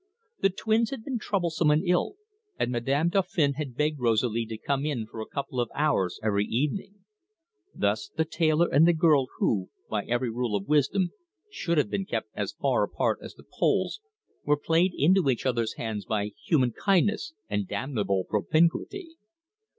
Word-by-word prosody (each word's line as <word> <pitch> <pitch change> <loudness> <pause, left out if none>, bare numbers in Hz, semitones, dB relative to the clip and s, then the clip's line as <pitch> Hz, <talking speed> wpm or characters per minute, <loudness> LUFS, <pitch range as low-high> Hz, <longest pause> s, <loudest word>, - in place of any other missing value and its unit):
The 195 - +4
twins 220 +4 +1
had 270 -5 -6
been 255 -2 -3
troublesome 170 -7 0
and 150 +5 +3
ill, 180 - +1 0.4
and 120 - 0
Madame 135 +7 +1
Dauphin 175 -6 +1
had 140 -3 -5
begged 150 +1 0
Rosalie 115 -1 +1
to 110 0 -5
come 140 +4 -1
in 140 -7 -2
for 110 0 -8
a - - -6
couple 140 -2 -4
of 120 -2 0
hours 140 - +1
every 105 -1 +1
evening. 190 - -2 0.7
Thus 425 - 0
the 160 - -1
tailor 160 +1 +2
and 155 +5 +5
the 175 - +5
girl 155 -5 +4
who, 95 -4 0 0.2
by 105 -2 -1
every 120 0 -1
rule 120 -2 -1
of 100 -1 -3
wisdom, 150 +5 +2 0.4
should 170 - -1
have 150 - +2
been 195 - -1
kept - - -3
as - - -3
far - - +2
apart - - 0
as - - -10
the - - -16 0.2
poles, 430 - +1 0.4
were 150 0 +2
played 165 +5 +2
into 175 +1 +4
each 125 -1 0
other's 115 -3 0
hands 110 -3 -4
by 105 -2 -1 0.2
human 130 -7 +3
kindness 175 - +1
and 100 -2 -2
damnable 105 -4 -1
propinquity. 170 - 0
145 Hz, 175 wpm, -27 LUFS, 115-175 Hz, 0.7 s, and